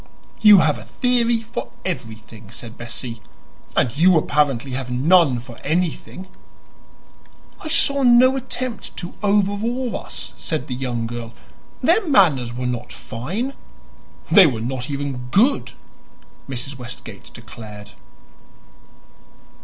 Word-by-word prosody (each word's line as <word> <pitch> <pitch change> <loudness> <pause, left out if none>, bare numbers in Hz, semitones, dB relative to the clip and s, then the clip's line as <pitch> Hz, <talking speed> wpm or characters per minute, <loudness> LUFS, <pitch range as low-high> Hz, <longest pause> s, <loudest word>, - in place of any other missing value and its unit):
"You 210 -2 +9
have 150 -6 +1
a - - -10
theory 235 - +1
for 235 +1 -6 0.2
everything," 110 - -6
said 115 0 -10
Bessie. 120 -1 -7 0.5
"And 120 0 +1
you 175 +3 +5
apparently 140 -4 +1
have 125 0 -4
none 140 +2 +4
for 120 0 -10
anything." 175 +3 -2 1.4
"I - - -5
saw 280 -3 +3
no 255 +1 +6
attempt 255 -2 -5
to 175 - -6
'overawe' 210 +5 0
us," - - -7
said 155 -5 -3
the 130 - -5
young 125 -3 -3
girl. 115 0 -6 0.5
"Their 445 - +4
manners 155 - +4
were 125 +1 -4
not 125 -1 -3
fine." 185 - -4 0.8
"They 195 -5 +9
were 120 -6 -2
not 125 +3 -4
even 140 -3 -4
good!" 240 - +2 0.8
Mrs. 130 +1 -5
Westgate 120 -4 -10
declared. 105 -3 -11
140 Hz, 120 wpm, -21 LUFS, -, 1.4 s, You